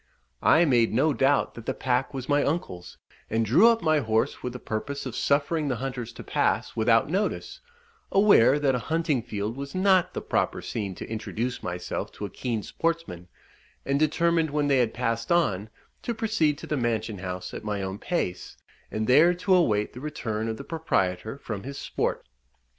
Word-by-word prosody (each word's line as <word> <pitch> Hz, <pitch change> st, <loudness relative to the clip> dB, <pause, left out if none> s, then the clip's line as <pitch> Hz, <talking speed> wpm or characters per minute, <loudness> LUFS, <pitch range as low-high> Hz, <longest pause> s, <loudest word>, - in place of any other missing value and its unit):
I 170 Hz, -, +5 dB
made 120 Hz, -6 st, +3 dB
no 150 Hz, +5 st, +3 dB
doubt 135 Hz, +1 st, +2 dB
that 115 Hz, -, -11 dB
the -, -, -1 dB
pack 125 Hz, +1 st, 0 dB
was 135 Hz, -2 st, -6 dB
my 145 Hz, 0 st, +3 dB
uncle's, 140 Hz, -, -3 dB, 0.3 s
and 115 Hz, 0 st, +1 dB
drew 160 Hz, -, +6 dB
up 230 Hz, -1 st, +3 dB
my 155 Hz, -1 st, +3 dB
horse 110 Hz, -3 st, 0 dB
with 125 Hz, -, -4 dB
the -, -, -5 dB
purpose 140 Hz, +7 st, -4 dB
of 125 Hz, -3 st, -5 dB
suffering 145 Hz, +2 st, +1 dB
the 130 Hz, -, 0 dB
hunters 125 Hz, -1 st, -4 dB
to -, -, -9 dB
pass -, -, 0 dB
without 115 Hz, 0 st, +3 dB
notice, 200 Hz, -, -2 dB, 0.5 s
aware 170 Hz, -, +6 dB
that 140 Hz, -2 st, +2 dB
a 125 Hz, -, 0 dB
hunting 160 Hz, -5 st, +1 dB
field 110 Hz, -1 st, -4 dB
was 140 Hz, +3 st, -7 dB
not 185 Hz, -1 st, +3 dB
the -, -, -2 dB
proper -, -, 0 dB
scene 100 Hz, -4 st, -4 dB
to -, -, -7 dB
introduce 115 Hz, +2 st, -3 dB
myself 90 Hz, 0 st, -4 dB
to 105 Hz, -, -6 dB
a 100 Hz, -, -7 dB
keen 115 Hz, -2 st, -3 dB
sportsman, 165 Hz, -, -3 dB, 0.6 s
and 140 Hz, +1 st, +1 dB
determined 165 Hz, +1 st, +2 dB
when 145 Hz, 0 st, 0 dB
they 135 Hz, -2 st, +4 dB
had 115 Hz, -3 st, +1 dB
passed 115 Hz, 0 st, -2 dB
on, 110 Hz, -, +1 dB, 0.3 s
to 235 Hz, -, -3 dB
proceed 210 Hz, -10 st, +1 dB
to -, -, -8 dB
the 150 Hz, -, -2 dB
mansion 110 Hz, -4 st, -1 dB
house 90 Hz, -1 st, -5 dB
at -, -, -6 dB
my 105 Hz, -2 st, -2 dB
own 95 Hz, +1 st, -4 dB
pace, 95 Hz, -, -3 dB, 0.3 s
and 110 Hz, 0 st, -2 dB
there 155 Hz, +9 st, +5 dB
to 180 Hz, +2 st, +1 dB
await 110 Hz, -, +2 dB
the 125 Hz, -, -9 dB
return 115 Hz, -7 st, -3 dB
of 110 Hz, 0 st, -3 dB
the -, -, -7 dB
proprietor 110 Hz, -, -1 dB
from 110 Hz, -7 st, -6 dB
his 140 Hz, +4 st, -7 dB
sport. -, -, -2 dB
130 Hz, 190 wpm, -26 LUFS, 110-155 Hz, 0.6 s, drew